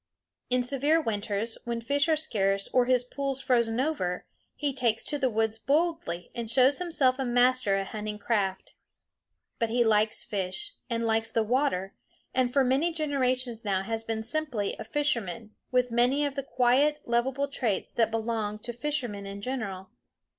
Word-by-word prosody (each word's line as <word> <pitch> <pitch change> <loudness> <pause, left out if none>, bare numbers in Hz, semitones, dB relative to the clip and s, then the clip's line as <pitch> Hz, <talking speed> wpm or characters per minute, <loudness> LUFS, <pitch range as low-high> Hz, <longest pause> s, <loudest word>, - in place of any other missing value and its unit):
In 250 0 +2
severe 280 +5 +2
winters, 220 -3 -2
when 235 -1 -2
fish 285 +6 +1
are 315 - +5
scarce 195 -10 0
or 250 -1 +3
his 250 -1 +3
pools 270 +1 -3
frozen 235 -3 +1
over, 255 - -1 0.3
he 290 -2 -1
takes 235 -4 +1
to 290 - 0
the 265 -2 +2
woods 220 0 0
boldly 290 - 0
and 235 -2 -4
shows 260 +6 +4
himself 285 -7 +1
a - - +1
master 245 -4 +3
at 195 -1 -2
hunting 210 -1 -4
craft. 200 -3 -1 0.9
But 230 -2 +1
he 240 +1 +3
likes 215 -1 +2
fish, 205 - -2 0.2
and 230 -1 -1
likes 225 0 +1
the 225 - +1
water, 220 -5 0 0.4
and 255 -1 +2
for 275 +1 +4
many 270 +7 +2
generations 255 -6 -1
now 195 -2 0
has 225 +2 -3
been 225 -1 -3
simply 245 -5 -2
a - - -4
fisherman, 230 - -1 0.2
with 250 -1 +2
many 250 +5 +3
of 285 - -2
the 275 - -2
quiet 275 +3 +2
lovable 260 +4 +1
traits 240 -8 -2
that 230 -2 +2
belong 220 -2 -2
to 240 +3 -7
fishermen 240 -7 -3
in 200 0 -6
general. 200 -5 -4
240 Hz, 170 wpm, -28 LUFS, 215-275 Hz, 0.9 s, are